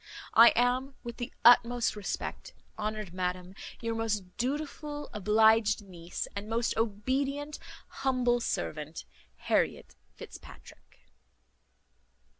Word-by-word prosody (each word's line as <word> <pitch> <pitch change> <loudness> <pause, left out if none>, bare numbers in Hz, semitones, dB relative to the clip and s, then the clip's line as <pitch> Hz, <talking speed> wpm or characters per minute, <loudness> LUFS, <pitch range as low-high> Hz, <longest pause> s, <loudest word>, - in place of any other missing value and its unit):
"I 230 +1 +9
am, 255 +3 +1
with 235 -1 -7
the 240 - -5
utmost 240 -1 +5
respect, 205 -2 -5 0.2
honoured 215 -3 -4
madam, 180 0 -3 0.3
your 230 -1 -2
most 210 -5 -2
dutiful 295 +2 -4
obliged 215 0 +4
niece, 175 -3 -6
and 200 +1 -5
most 230 +1 0
obedient 270 +7 -1 0.3
humble 250 -3 +1
servant, 155 -8 -4 0.4
HARRIET - - 0 0.2
FITZPATRICK." - - -13
225 Hz, 95 wpm, -30 LUFS, 205-250 Hz, 0.4 s, I